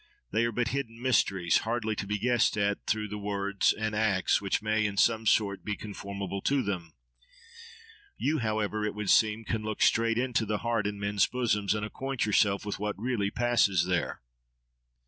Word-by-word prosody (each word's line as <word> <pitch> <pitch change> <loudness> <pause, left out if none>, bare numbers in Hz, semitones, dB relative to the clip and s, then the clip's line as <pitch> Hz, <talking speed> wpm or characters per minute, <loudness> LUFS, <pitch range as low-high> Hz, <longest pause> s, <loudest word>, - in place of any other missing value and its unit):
They 110 +3 +2
are 115 - -1
but 120 +1 -1
hidden 115 -3 -4
mysteries, 100 -8 +2
hardly 110 -1 -2
to 100 - -4
be 105 +1 -1
guessed 120 0 +2
at 100 0 -1
through 110 0 0
the 105 +1 -6
words 100 -1 0
and 110 0 -3
acts 105 -4 +2
which 100 -1 0
may 110 0 0
in 100 -1 -2
some 110 0 +3
sort 100 -3 +2
be 105 - -2
conformable 100 -1 -6
to 140 -2 +1
them. 90 -5 -4 1.2
You, 155 +1 0
however, 110 -2 -1
it 105 -1 -2
would 105 -2 0
seem, 110 0 +3
can 110 0 -2
look 110 -1 -1
straight 115 0 +3
into 120 -3 0
the 105 0 0
heart 115 -3 +1
in 105 0 -4
men's 100 0 +1
bosoms, 110 -5 0
and 105 0 -2
acquaint 135 +4 -3
yourself 100 -1 +2
with 105 - -4
what 105 -1 -3
really 110 -4 -1
passes 100 -7 +2
there. 90 -1 -1
105 Hz, 185 wpm, -29 LUFS, 100-115 Hz, 1.2 s, some